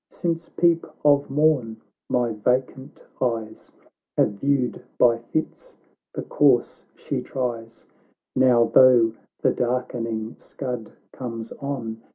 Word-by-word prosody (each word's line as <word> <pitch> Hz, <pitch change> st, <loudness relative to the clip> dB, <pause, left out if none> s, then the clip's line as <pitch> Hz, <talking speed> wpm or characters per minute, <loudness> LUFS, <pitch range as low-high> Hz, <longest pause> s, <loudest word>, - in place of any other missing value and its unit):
Since 165 Hz, -1 st, -3 dB
peep 170 Hz, -1 st, +2 dB, 0.2 s
of 145 Hz, -1 st, +4 dB
morn, 135 Hz, -6 st, +1 dB, 0.3 s
my 120 Hz, -2 st, +1 dB
vacant 125 Hz, +4 st, -2 dB, 0.2 s
eyes 115 Hz, -4 st, -3 dB, 0.5 s
Have -, -, +3 dB
viewed 130 Hz, +4 st, -1 dB, 0.2 s
by 120 Hz, -1 st, +4 dB
fits 155 Hz, -, -5 dB, 0.4 s
the -, -, -3 dB
course -, -, +2 dB
she -, -, -4 dB
tries; 115 Hz, -3 st, -5 dB, 0.5 s
Now, 125 Hz, -2 st, +5 dB
though 120 Hz, -4 st, +6 dB, 0.3 s
the -, -, +4 dB
darkening 115 Hz, -2 st, -2 dB
s^ud 125 Hz, -5 st, -6 dB, 0.2 s
comes 115 Hz, -3 st, -6 dB
on. 120 Hz, -5 st, -5 dB
125 Hz, 110 wpm, -24 LUFS, 115-140 Hz, 0.5 s, though